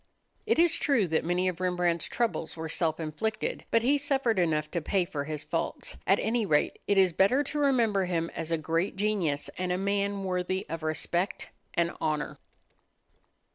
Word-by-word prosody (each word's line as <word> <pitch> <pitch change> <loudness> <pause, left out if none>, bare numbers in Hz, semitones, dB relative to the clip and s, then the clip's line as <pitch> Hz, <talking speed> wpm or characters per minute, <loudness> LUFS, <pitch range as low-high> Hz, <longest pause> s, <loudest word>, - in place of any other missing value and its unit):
It 455 - +3
is 335 0 +4
true 270 -9 +3
that 160 - +1
many 175 +2 +1
of 180 -1 -2
Rembrandt's 180 -2 0
troubles 225 -9 -2
were 160 0 -4
self 160 0 +1
inflicted: 215 +8 -3
but 230 0 +3
he 285 +4 +3
suffered 270 -7 +1
enough 155 -3 +1
to 170 - -1
pay 185 +3 +1
for 145 -4 -4
his 155 0 -5
faults. - - -3
At - - +5
any 230 +1 0
rate 150 -7 +1
it 200 - +2
is 185 -3 +5
better 245 - +4
to 295 +1 -3
remember 230 -9 +3
him 170 -2 -1
as 165 0 -4
a 165 - +2
great 165 +4 -1
genius 195 -8 0
and 180 -1 -1
a 180 - +1
man 200 0 0
worthy 185 0 -1
of 165 +1 -4
respect 170 +4 -1 0.2
and 170 0 +2
honor. 150 -1 -2
185 Hz, 180 wpm, -29 LUFS, 165-215 Hz, 0.2 s, At